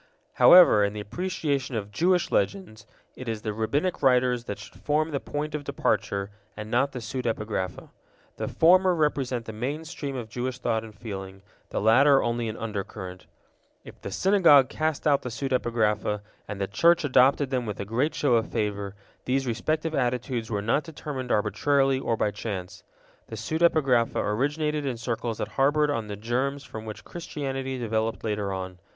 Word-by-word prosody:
However, 175 Hz, -, +8 dB
in 100 Hz, 0 st, 0 dB
the 105 Hz, -, -5 dB
appreciation 140 Hz, -, -2 dB
of 105 Hz, -2 st, -4 dB
Jewish 175 Hz, -, +1 dB
Legends, 115 Hz, -, -1 dB, 0.3 s
it 130 Hz, -2 st, -6 dB
is 110 Hz, -1 st, -4 dB
the 110 Hz, -1 st, -2 dB
Rabbinic 140 Hz, -, -1 dB
writers 125 Hz, -2 st, +3 dB
that 100 Hz, -, -5 dB
should 105 Hz, -, -13 dB
form 155 Hz, +2 st, 0 dB
the 140 Hz, -, -1 dB
point 150 Hz, +2 st, -4 dB
of 150 Hz, -1 st, -3 dB
departure, 100 Hz, -7 st, -1 dB, 0.3 s
and 105 Hz, +1 st, -7 dB
not 135 Hz, +4 st, +2 dB
the 130 Hz, -, -7 dB
pseudepigrapha. 110 Hz, -6 st, -3 dB, 0.5 s
The -, -, -3 dB
former 185 Hz, +2 st, +4 dB
represent 135 Hz, -6 st, 0 dB
the 110 Hz, -, -7 dB
main 140 Hz, +9 st, -4 dB
stream 145 Hz, -4 st, -5 dB
of 120 Hz, -3 st, -5 dB
Jewish 125 Hz, +2 st, -4 dB
thought 115 Hz, -3 st, -1 dB
and 110 Hz, -2 st, -11 dB
feeling, 95 Hz, -3 st, -7 dB, 0.3 s
the -, -, -2 dB
latter 135 Hz, +6 st, +5 dB
only 115 Hz, -1 st, -1 dB
an 110 Hz, -, -6 dB
undercurrent. 100 Hz, -4 st, -6 dB, 0.6 s
If -, -, -13 dB
the -, -, -5 dB
Synagogue 165 Hz, -, +5 dB
cast 155 Hz, -2 st, -2 dB
out 145 Hz, -2 st, +4 dB
the 125 Hz, -, -5 dB
pseudepigrapha, 115 Hz, -5 st, 0 dB, 0.3 s
and 105 Hz, -2 st, -6 dB
the 100 Hz, -, 0 dB
Church 165 Hz, -, +3 dB
adopted 135 Hz, 0 st, +3 dB
them 125 Hz, -3 st, -1 dB
with 105 Hz, -, -5 dB
a 100 Hz, -, -3 dB
great 125 Hz, +9 st, 0 dB
show 140 Hz, -4 st, +2 dB
of 115 Hz, -, -1 dB
favor, 100 Hz, -2 st, -2 dB, 0.3 s
these 135 Hz, +1 st, 0 dB
respective 155 Hz, +7 st, -1 dB
attitudes 125 Hz, -3 st, -1 dB
were 105 Hz, -3 st, -2 dB
not 115 Hz, +7 st, +2 dB
determined 140 Hz, -5 st, -6 dB
arbitrarily 135 Hz, +5 st, +2 dB
or 115 Hz, -3 st, -1 dB
by 105 Hz, -, +1 dB
chance. 100 Hz, -3 st, -6 dB, 0.4 s
The 110 Hz, -, -7 dB
pseudepigrapha 135 Hz, -1 st, +2 dB
originated 150 Hz, +7 st, 0 dB
in 130 Hz, -4 st, -2 dB
circles 115 Hz, -1 st, -3 dB
that -, -, -3 dB
harbored 145 Hz, +2 st, +2 dB, 0.2 s
the 105 Hz, -, -5 dB
germs 130 Hz, +6 st, -2 dB
from 110 Hz, -4 st, -8 dB
which 110 Hz, -1 st, -8 dB
Christianity 135 Hz, -5 st, -4 dB
developed 110 Hz, -1 st, -2 dB
later 105 Hz, -2 st, -2 dB
on. 95 Hz, -1 st, -5 dB
125 Hz, 170 wpm, -26 LUFS, 110-145 Hz, 0.6 s, However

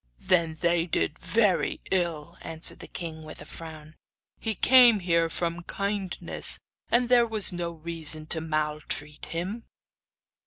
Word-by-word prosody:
'Then 170 Hz, -3 st, +1 dB
they 170 Hz, 0 st, +2 dB
did 155 Hz, -2 st, -1 dB
very 210 Hz, -5 st, +1 dB
ill,' 170 Hz, -3 st, -1 dB
answered 165 Hz, 0 st, -1 dB
the -, -, -9 dB
king, 160 Hz, -2 st, -6 dB
with 155 Hz, 0 st, -10 dB
a -, -, -8 dB
frown. 155 Hz, -1 st, -10 dB, 0.4 s
'He 220 Hz, -2 st, -1 dB
came 245 Hz, 0 st, +7 dB
here 170 Hz, -2 st, +2 dB
from 170 Hz, +1 st, -2 dB
kindness, 200 Hz, -2 st, -2 dB, 0.3 s
and 240 Hz, +1 st, +3 dB
there 240 Hz, -1 st, +5 dB
was 215 Hz, -4 st, +2 dB
no 175 Hz, -1 st, -2 dB
reason 160 Hz, -1 st, -1 dB
to 160 Hz, +1 st, -1 dB
maltreat 150 Hz, -1 st, -2 dB
him. 185 Hz, +8 st, -4 dB
170 Hz, 140 wpm, -27 LUFS, 160-195 Hz, 0.4 s, came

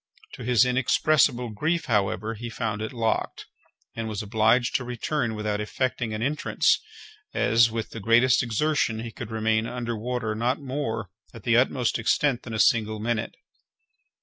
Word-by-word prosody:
To 125 Hz, -, -8 dB
his 125 Hz, +1 st, +4 dB
inexpressible 125 Hz, 0 st, +2 dB
grief, 160 Hz, +10 st, -1 dB
however, 105 Hz, 0 st, 0 dB
he 120 Hz, +2 st, -7 dB
found 110 Hz, -2 st, -3 dB
it 110 Hz, -, -4 dB
locked, 115 Hz, -3 st, -2 dB, 0.5 s
and 115 Hz, -1 st, -3 dB
was 105 Hz, 0 st, -4 dB
obliged 110 Hz, +3 st, +2 dB
to 130 Hz, -, -6 dB
return 125 Hz, 0 st, -2 dB
without 105 Hz, -1 st, -2 dB
effecting 120 Hz, +1 st, -2 dB
an 110 Hz, +1 st, -3 dB
entrance, 145 Hz, +4 st, +2 dB, 0.6 s
as, 115 Hz, +1 st, +4 dB
with 115 Hz, 0 st, -4 dB
the 115 Hz, -, -7 dB
greatest 115 Hz, +4 st, +4 dB
exertion, 120 Hz, -1 st, 0 dB
he 115 Hz, 0 st, -6 dB
could 110 Hz, -, -8 dB
remain 110 Hz, 0 st, 0 dB
under 120 Hz, -1 st, -3 dB
water 115 Hz, 0 st, -2 dB
not 120 Hz, +5 st, 0 dB
more, 125 Hz, -, -4 dB, 0.2 s
at 115 Hz, -, -11 dB
the 115 Hz, -, +2 dB
utmost 125 Hz, -1 st, +2 dB
extent, 125 Hz, +3 st, +1 dB
than 115 Hz, -, -8 dB
a -, -, -3 dB
single 110 Hz, 0 st, +3 dB
minute. 110 Hz, 0 st, -2 dB
115 Hz, 160 wpm, -25 LUFS, 110-125 Hz, 0.6 s, his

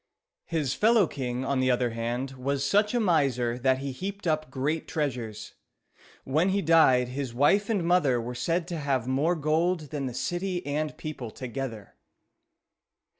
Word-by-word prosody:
His 150 Hz, -5 st, -1 dB
fellow 220 Hz, -2 st, +4 dB
king, 130 Hz, -4 st, -4 dB
on 140 Hz, -1 st, 0 dB
the 130 Hz, 0 st, +2 dB
other 125 Hz, -1 st, +1 dB
hand, 120 Hz, +3 st, -3 dB
was 135 Hz, +1 st, -2 dB
such 210 Hz, -, +2 dB
a -, -, +3 dB
miser 135 Hz, -, +1 dB
that 130 Hz, +1 st, +2 dB
he 135 Hz, +1 st, -4 dB
heaped 195 Hz, +9 st, -6 dB
up 155 Hz, -3 st, 0 dB
great 140 Hz, +5 st, -2 dB
treasures. 120 Hz, -8 st, -3 dB, 0.7 s
When 155 Hz, +8 st, +1 dB
he 200 Hz, +1 st, +1 dB
died, 135 Hz, -6 st, +5 dB
his 130 Hz, -2 st, -4 dB
wife 195 Hz, -, +3 dB
and 205 Hz, -6 st, +1 dB
mother 165 Hz, -8 st, +3 dB
were 120 Hz, +2 st, -4 dB
said 165 Hz, +7 st, -1 dB
to 170 Hz, -2 st, -3 dB
have 135 Hz, -5 st, 0 dB
more 145 Hz, +7 st, +1 dB
gold 160 Hz, +1 st, 0 dB
than 140 Hz, -3 st, -2 dB
the 125 Hz, -, -6 dB
city 175 Hz, +3 st, -2 dB
and 150 Hz, +1 st, -2 dB
people 145 Hz, -6 st, -6 dB
together. 125 Hz, -3 st, -6 dB
140 Hz, 165 wpm, -27 LUFS, 125-170 Hz, 0.7 s, died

